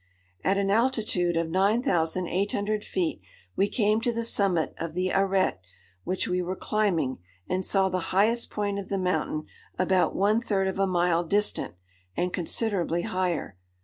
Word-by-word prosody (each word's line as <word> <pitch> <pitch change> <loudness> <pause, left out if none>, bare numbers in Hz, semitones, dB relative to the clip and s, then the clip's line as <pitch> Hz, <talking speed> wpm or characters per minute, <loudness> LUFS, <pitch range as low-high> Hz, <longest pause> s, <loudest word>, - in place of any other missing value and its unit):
At 195 +1 +2
an 195 0 +1
altitude 215 -7 +1
of 165 -1 -1
9800 200 - +1
feet 170 - -2 0.3
we 200 +1 +2
came 215 0 +2
to 240 0 +1
the 230 0 -2
summit 195 -7 +1
of 165 -1 -5
the 185 +1 0
arête 190 - +2 0.5
which 185 - -1
we 180 0 0
were 180 +1 -3
climbing, 180 -12 0 0.3
and 185 +1 -1
saw 195 0 +3
the 185 -1 -1
highest 220 +5 +2
point 205 -1 -2
of 195 - -8
the 195 - -1
mountain 160 -4 -1 0.3
about 185 0 +2
one 210 +3 +2
third 195 -5 0
of 190 0 -3
a 195 - +3
mile 175 -2 +2
distant, 200 - +1 0.4
and 180 +1 -1
considerably 175 -2 0
higher. 180 - -2
190 Hz, 155 wpm, -27 LUFS, 175-205 Hz, 0.5 s, saw